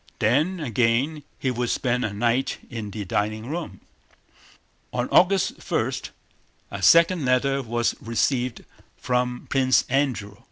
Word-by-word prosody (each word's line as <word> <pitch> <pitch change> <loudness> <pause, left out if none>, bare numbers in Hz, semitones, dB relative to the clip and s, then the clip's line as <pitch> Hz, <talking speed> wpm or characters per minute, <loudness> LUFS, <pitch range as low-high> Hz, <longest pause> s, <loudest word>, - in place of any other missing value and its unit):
Then 150 - +1
again 125 +3 0 0.2
he 130 - -1
would 120 0 -2
spend 125 -1 0
a 110 - -1
night 120 +5 0
in 110 -3 -5
the 100 0 -6
dining 110 +4 -2
room. 155 - -5 1.1
On - - -1
August 190 0 +2
1, - - +1 0.8
a 100 - -6
second 170 - +5
letter 135 +2 +2
was 120 -1 0
received 120 +2 -1 0.3
from 125 0 -1
Prince 130 -1 +3
Andrew. 125 -7 -1
125 Hz, 125 wpm, -24 LUFS, 115-140 Hz, 1.1 s, second